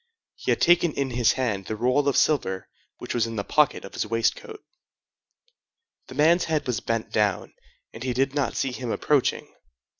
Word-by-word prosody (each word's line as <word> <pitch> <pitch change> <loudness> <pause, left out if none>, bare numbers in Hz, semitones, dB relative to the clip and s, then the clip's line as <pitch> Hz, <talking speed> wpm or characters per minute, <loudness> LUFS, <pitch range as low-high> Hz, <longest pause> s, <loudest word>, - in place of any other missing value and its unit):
He - - -6
had - - +2
taken 175 -2 +4
in 135 -2 -2
his 120 -2 +3
hand 110 -7 -2
the 110 - -3
roll 125 +6 +1
of 140 - +2
silver 95 -11 +1 0.3
which - - -6
was 115 -2 +1
in 115 - -6
the 100 - -2
pocket 150 +5 +1
of 100 - -11
his - - -1
waistcoat. 415 - -2 1.4
The - - -11
man's 165 +4 +4
head 155 -2 -1
was 125 -5 -1
bent 115 -1 -3
down, 105 -4 0 0.4
and 115 - -10
he 130 0 -2
did 135 +2 0
not 145 -2 -1
see 135 - 0
him 125 -1 -5
approaching. 140 +3 0
125 Hz, 185 wpm, -25 LUFS, 115-150 Hz, 1.4 s, taken